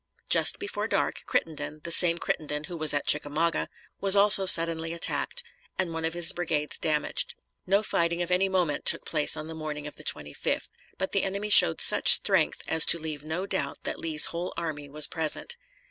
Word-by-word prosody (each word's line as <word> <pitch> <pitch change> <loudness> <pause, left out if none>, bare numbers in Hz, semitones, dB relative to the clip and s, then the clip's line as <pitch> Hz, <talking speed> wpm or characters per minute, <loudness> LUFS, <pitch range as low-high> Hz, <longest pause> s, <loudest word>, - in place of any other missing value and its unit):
Just - - +4
before 400 - -4
dark - - -2
Crittenden 155 -1 -4
the 170 - -4
same 170 0 +3
Crittenden 150 -3 -4
who 170 +3 -9
was 155 -2 +1
at 145 -1 -2
Chickamauga 150 +3 +1 0.3
was 195 0 +4
also 200 -1 +6
suddenly 165 -1 +5
attacked, 330 - -2 0.3
and 180 -3 -2
one 165 0 -4
of 165 +1 -3
his 175 -1 +3
brigades 155 -4 -3
damaged. 155 -2 -2 0.3
No 200 +3 +1
fighting 170 -3 -1
of 175 - -7
any 190 +2 +1
moment 180 -6 -2
took - - +2
place 150 -2 +1
on 155 - -6
the 160 - -9
morning 155 -2 -7
of 150 - -10
the 155 - -11
25th, 75 - -4 0.3
but 190 - -4
the 195 - 0
enemy 200 +2 -4
showed 80 - +6
such - - +3
strength - - 0
as 160 -1 +2
to - - +6
leave 155 -3 -7
no 160 +5 -5
doubt 170 -8 -4
that - - -4
Lee's 155 -2 +3
whole 175 +2 -6
army 150 -4 -6
was 150 +1 0
present. 160 - -3
165 Hz, 190 wpm, -26 LUFS, 150-180 Hz, 0.3 s, also